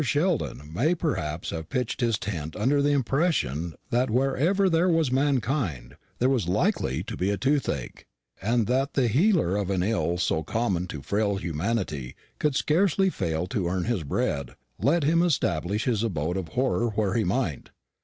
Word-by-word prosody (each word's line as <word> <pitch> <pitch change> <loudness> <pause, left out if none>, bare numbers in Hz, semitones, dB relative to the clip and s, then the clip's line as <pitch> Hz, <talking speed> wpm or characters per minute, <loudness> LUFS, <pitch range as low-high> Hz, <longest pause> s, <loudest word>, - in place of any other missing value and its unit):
Sheldon 145 - -1
may, 150 - +2
perhaps, 85 - -2
have 80 -1 -5
pitched 125 0 -2
his 115 -3 +2
tent 80 -7 -5
under 135 +7 +2
the 145 - +2
impression 130 - 0 0.2
that 125 +2 +2
wherever 135 - +2
there 175 +1 +3
was 165 -6 +2
mankind 125 - 0 0.2
there 125 - +2
was 130 -9 +1
likely 100 - 0
to - - -6
be 100 +2 0
toothache, 130 - -1 0.4
and 115 +3 +1
that 135 +4 0
the 130 -3 +3
healer 150 - +3
of 100 -2 -1
an 95 -2 +1
ill 95 -4 0
so 80 -3 0
common 90 0 -1
to 75 -5 -7
frail 100 +5 0
humanity 85 - -2 0.2
could 150 -3 +1
scarcely 190 +5 +2
fail 80 - -2
to 90 -1 -2
earn 90 +1 -1
his 115 -4 -1
bread, 70 -3 -2 0.2
let 160 +4 +2
him 165 +4 +3
establish 105 - 0
his 115 -5 0
abode 90 -6 -1
of 95 -3 -3
horror 125 +2 0
where 105 -3 +1
he 115 - +2
might. 90 - -1
110 Hz, 165 wpm, -26 LUFS, 85-140 Hz, 0.4 s, there